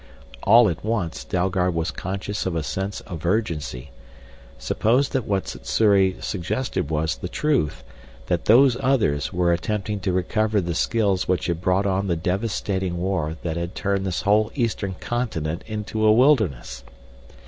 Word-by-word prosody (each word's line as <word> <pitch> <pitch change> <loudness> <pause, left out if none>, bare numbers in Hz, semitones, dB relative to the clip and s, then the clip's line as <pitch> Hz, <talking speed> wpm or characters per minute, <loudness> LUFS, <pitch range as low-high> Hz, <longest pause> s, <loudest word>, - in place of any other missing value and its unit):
All 120 0 +6
at 85 -5 -3
once 90 - -2
Dalgard 90 +2 0
was 80 0 -1
conscious 95 +1 -4
of 90 - -2
a 80 - -1
sense 95 +7 -3
of 85 -4 -8
urgency. 80 - -2 0.7
Suppose 125 - +1
that 130 -4 -1
what 100 -2 -1
Sssuri 100 -4 +2
suggested 95 - -2
was 80 0 -1
the 90 - -6
truth, 145 - 0 0.4
that 85 +5 -1
Those 125 +3 +6
Others 125 - +1
were 90 -1 +2
attempting 105 +4 -2
to 95 -1 -1
recover 105 +4 +1
the 85 -2 -2
skills 100 -1 +1
which 90 -1 0
had 85 -1 -2
brought 90 +2 +1
on 100 0 0
the 85 - +1
devastating 95 0 -2
war 85 -4 -2
that 85 -1 -2
had 85 +1 -4
turned 100 -1 -1
this 90 - -2
whole 105 +2 +3
eastern 105 -7 -1
continent 85 -10 -3
into 110 0 -3
a 110 - +6
wilderness? 110 - +2
95 Hz, 155 wpm, -23 LUFS, 85-110 Hz, 0.7 s, All